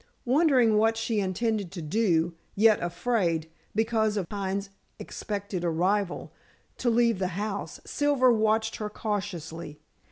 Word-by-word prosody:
Wondering 255 Hz, -5 st, +4 dB
what 225 Hz, +1 st, +3 dB
she 225 Hz, -1 st, 0 dB
intended 200 Hz, 0 st, -1 dB
to 175 Hz, -, -5 dB
do, 170 Hz, -1 st, +1 dB, 0.2 s
yet 215 Hz, 0 st, +5 dB
afraid 170 Hz, -4 st, 0 dB, 0.2 s
because 220 Hz, -1 st, +1 dB
of 190 Hz, -4 st, -2 dB
Pine's 195 Hz, 0 st, -3 dB, 0.3 s
expected 200 Hz, -3 st, -5 dB
arrival 180 Hz, +3 st, 0 dB, 0.4 s
to 245 Hz, -, +1 dB
leave 230 Hz, -3 st, +3 dB
the 185 Hz, -, 0 dB
house, 205 Hz, -1 st, -4 dB
Silver 280 Hz, -4 st, +3 dB
watched 220 Hz, 0 st, +1 dB
her 210 Hz, -1 st, -4 dB
cautiously. 170 Hz, -8 st, -4 dB
210 Hz, 125 wpm, -27 LUFS, 185-225 Hz, 0.4 s, yet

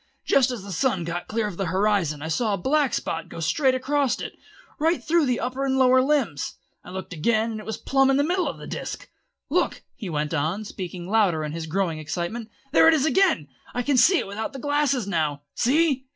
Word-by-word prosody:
Just 265 Hz, -2 st, +4 dB
as 240 Hz, -6 st, -5 dB
the 200 Hz, -, -8 dB
sun 190 Hz, -1 st, 0 dB
got 170 Hz, +1 st, -4 dB
clear 225 Hz, 0 st, -1 dB
above 200 Hz, -5 st, -5 dB
the 195 Hz, -, 0 dB
horizon 185 Hz, -5 st, +1 dB
I -, -, -3 dB
saw 205 Hz, +6 st, 0 dB
a -, -, -5 dB
black 280 Hz, +7 st, +1 dB
spot 165 Hz, -, -3 dB
go -, -, -8 dB
straight 260 Hz, -, +2 dB
across 275 Hz, 0 st, 0 dB
it, -, -, -5 dB, 0.5 s
right 325 Hz, +3 st, +1 dB
through 325 Hz, -2 st, +2 dB
the 250 Hz, -1 st, +1 dB
upper 255 Hz, +3 st, -2 dB
and 265 Hz, -1 st, +1 dB
lower 260 Hz, 0 st, +5 dB
limbs. 260 Hz, -, 0 dB, 0.3 s
I -, -, -12 dB
looked 190 Hz, 0 st, -6 dB
again, 220 Hz, +7 st, +1 dB
and 215 Hz, -, -5 dB
it 215 Hz, -, -10 dB
was 220 Hz, -, -3 dB
plumb 270 Hz, 0 st, +2 dB
in 270 Hz, -, +3 dB
the 285 Hz, -, +3 dB
middle 355 Hz, +4 st, +1 dB
of -, -, -4 dB
the -, -, -9 dB
disc. -, -, -6 dB, 0.4 s
Look," -, -, 0 dB
he 200 Hz, -, -7 dB
went 150 Hz, 0 st, -2 dB
on, 165 Hz, +8 st, -1 dB
speaking 180 Hz, -3 st, -6 dB
louder 195 Hz, -7 st, +2 dB
in 150 Hz, -, -3 dB
his 160 Hz, 0 st, -5 dB
growing 170 Hz, -2 st, -1 dB
excitement, 175 Hz, +9 st, -4 dB, 0.2 s
"there 320 Hz, -, +6 dB
it 325 Hz, -, +7 dB
is 295 Hz, -2 st, +1 dB
again! 320 Hz, -, +3 dB, 0.3 s
I 245 Hz, -, 0 dB
can 280 Hz, +2 st, +1 dB
see 360 Hz, +9 st, +6 dB
it -, -, -1 dB
without 210 Hz, +5 st, -5 dB
the -, -, -6 dB
glasses 290 Hz, -4 st, +1 dB
now. 155 Hz, -6 st, -1 dB
See?" 275 Hz, 0 st, +2 dB
220 Hz, 225 wpm, -24 LUFS, 175-270 Hz, 0.5 s, it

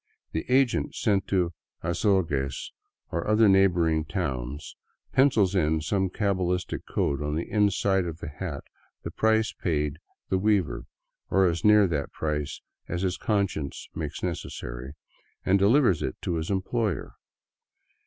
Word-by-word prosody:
The 80 Hz, -, -4 dB
agent 130 Hz, -1 st, +2 dB
sent 100 Hz, -3 st, +1 dB
to 90 Hz, -3 st, +1 dB, 0.3 s
Azogues 85 Hz, -7 st, 0 dB, 0.4 s
or 85 Hz, 0 st, -2 dB
other 110 Hz, +1 st, +5 dB
neighboring 85 Hz, -5 st, +4 dB
towns 70 Hz, -1 st, -4 dB, 0.4 s
pencils 115 Hz, -8 st, +4 dB
in 80 Hz, -4 st, +2 dB
some 95 Hz, +5 st, 0 dB
cabalistic 90 Hz, -3 st, -1 dB
code 70 Hz, 0 st, 0 dB
on 75 Hz, 0 st, -2 dB
the 80 Hz, -, -2 dB
inside 100 Hz, -2 st, +2 dB
of 80 Hz, -1 st, -5 dB
the 85 Hz, -, -7 dB
hat 75 Hz, -1 st, -5 dB, 0.4 s
the -, -, -5 dB
price 110 Hz, -1 st, +2 dB
paid 75 Hz, -3 st, -1 dB, 0.3 s
the 95 Hz, -, +2 dB
weaver 100 Hz, -4 st, +1 dB, 0.2 s
— -, -, -56 dB
or 95 Hz, 0 st, +4 dB
as 85 Hz, -1 st, 0 dB
near 105 Hz, -1 st, +6 dB
that 75 Hz, -6 st, -2 dB
price 75 Hz, -1 st, -3 dB, 0.3 s
as 85 Hz, +2 st, -3 dB
his 95 Hz, -1 st, 0 dB
conscience 100 Hz, -9 st, -2 dB
makes 75 Hz, -1 st, -5 dB
necessary 65 Hz, -7 st, -5 dB, 0.3 s
— -, -, -39 dB
and 95 Hz, +1 st, +4 dB
delivers 105 Hz, -, +4 dB
it 65 Hz, -, -2 dB
to 85 Hz, -, -1 dB
his 80 Hz, 0 st, -3 dB
employer. 100 Hz, 0 st, -1 dB
90 Hz, 145 wpm, -27 LUFS, 75-100 Hz, 0.4 s, near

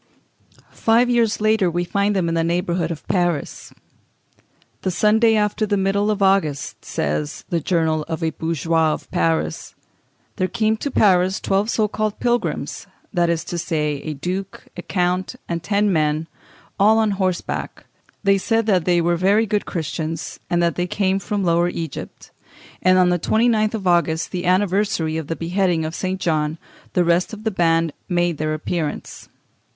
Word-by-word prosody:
Five 235 Hz, +2 st, +3 dB
years 230 Hz, -3 st, +2 dB
later 215 Hz, -3 st, +2 dB
we 175 Hz, +1 st, -1 dB
find 200 Hz, +3 st, 0 dB
them 185 Hz, -3 st, +1 dB
in 165 Hz, -, -1 dB
the 165 Hz, 0 st, +1 dB
neighbourhood 170 Hz, 0 st, 0 dB
of 165 Hz, -3 st, -7 dB
Paris. 175 Hz, -6 st, -1 dB, 1.1 s
"The -, -, -1 dB
Sunday 220 Hz, +5 st, +3 dB
after 210 Hz, 0 st, +1 dB
the 205 Hz, 0 st, +1 dB
middle 195 Hz, +2 st, +1 dB
of 210 Hz, -2 st, 0 dB
August," 190 Hz, -8 st, +1 dB
says 75 Hz, +1 st, -3 dB
"The 170 Hz, -, +1 dB
Journal 160 Hz, -1 st, 0 dB
of 165 Hz, 0 st, -4 dB
a 160 Hz, -, +1 dB
Bourgeois 160 Hz, 0 st, 0 dB
of -, -, -8 dB
Paris," 80 Hz, -1 st, -1 dB, 0.6 s
"there 185 Hz, -, +1 dB
came 220 Hz, +2 st, +1 dB
to 285 Hz, -, -3 dB
Paris 190 Hz, -5 st, +3 dB
twelve 195 Hz, +3 st, 0 dB
so 215 Hz, -2 st, +1 dB
called 215 Hz, 0 st, -2 dB
pilgrims, 240 Hz, 0 st, -1 dB, 0.3 s
that 175 Hz, -2 st, +2 dB
is 165 Hz, -1 st, 0 dB
to 175 Hz, 0 st, -4 dB
say, 150 Hz, -3 st, -1 dB
a 155 Hz, 0 st, -5 dB
duke, 185 Hz, +6 st, -5 dB
a 175 Hz, -, -6 dB
count, 180 Hz, +4 st, -1 dB
and 170 Hz, -1 st, -3 dB
ten 200 Hz, +1 st, +1 dB
men, 155 Hz, 0 st, +1 dB, 0.5 s
all 215 Hz, +3 st, +5 dB
on 220 Hz, -2 st, +2 dB
horseback; 190 Hz, -2 st, -3 dB, 0.4 s
they 195 Hz, -1 st, +4 dB
said 225 Hz, +3 st, +1 dB
that 185 Hz, -6 st, +2 dB
they 175 Hz, -1 st, +3 dB
were 170 Hz, +1 st, +2 dB
very 200 Hz, +6 st, +3 dB
good 210 Hz, -1 st, -1 dB
Christians, 160 Hz, 0 st, -4 dB
and 175 Hz, 0 st, +2 dB
that 170 Hz, -, 0 dB
they 180 Hz, 0 st, 0 dB
came 190 Hz, +1 st, 0 dB
from 200 Hz, 0 st, -2 dB
Lower 170 Hz, 0 st, +2 dB
Egypt;... 165 Hz, -4 st, -7 dB, 0.5 s
and 185 Hz, 0 st, +4 dB
on 180 Hz, -1 st, +5 dB
the 175 Hz, 0 st, +1 dB
29th 220 Hz, +2 st, +2 dB
of 205 Hz, -3 st, -5 dB
August, 170 Hz, -2 st, +1 dB
the 180 Hz, -1 st, -3 dB
anniversary 185 Hz, -3 st, +1 dB
of 160 Hz, -3 st, -4 dB
the 165 Hz, -, -2 dB
beheading 175 Hz, -1 st, 0 dB
of 160 Hz, -, -4 dB
St. 185 Hz, +2 st, -3 dB
John, 155 Hz, -2 st, 0 dB, 0.4 s
the 180 Hz, -, +3 dB
rest 170 Hz, +4 st, +1 dB
of 215 Hz, 0 st, -8 dB
the 220 Hz, -, 0 dB
band 165 Hz, -4 st, +2 dB, 0.2 s
made 175 Hz, -3 st, 0 dB
their 155 Hz, 0 st, -1 dB
appearance. 155 Hz, 0 st, -4 dB
180 Hz, 170 wpm, -21 LUFS, 165-205 Hz, 1.1 s, all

